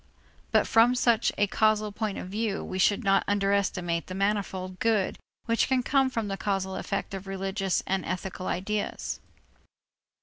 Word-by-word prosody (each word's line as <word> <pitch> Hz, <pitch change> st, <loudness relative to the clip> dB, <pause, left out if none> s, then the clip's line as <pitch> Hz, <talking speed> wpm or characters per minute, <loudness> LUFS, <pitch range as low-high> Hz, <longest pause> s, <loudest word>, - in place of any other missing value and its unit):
But -, -, +4 dB
from 235 Hz, +2 st, +5 dB
such 235 Hz, -3 st, +3 dB
a 205 Hz, -, +4 dB
causal 215 Hz, +1 st, +2 dB
point 210 Hz, -1 st, -3 dB
of -, -, -5 dB
view, 210 Hz, +1 st, -2 dB
we 185 Hz, -, -4 dB
should 205 Hz, +4 st, +3 dB
not 195 Hz, -1 st, +3 dB
underestimate 195 Hz, -4 st, 0 dB
the 185 Hz, -, -6 dB
manifold 190 Hz, -2 st, -1 dB
good 220 Hz, -4 st, +1 dB, 0.3 s
which 230 Hz, 0 st, +2 dB
can 260 Hz, -1 st, +2 dB
come 270 Hz, 0 st, +3 dB
from 230 Hz, -4 st, -2 dB
the 195 Hz, -1 st, -3 dB
causal 190 Hz, -1 st, -1 dB
effect 195 Hz, +1 st, -3 dB
of 195 Hz, 0 st, -6 dB
religious 195 Hz, 0 st, -1 dB
and 190 Hz, -1 st, 0 dB
ethical 185 Hz, +1 st, -4 dB
ideas. 205 Hz, +3 st, -2 dB
200 Hz, 160 wpm, -28 LUFS, 190-215 Hz, 0.3 s, from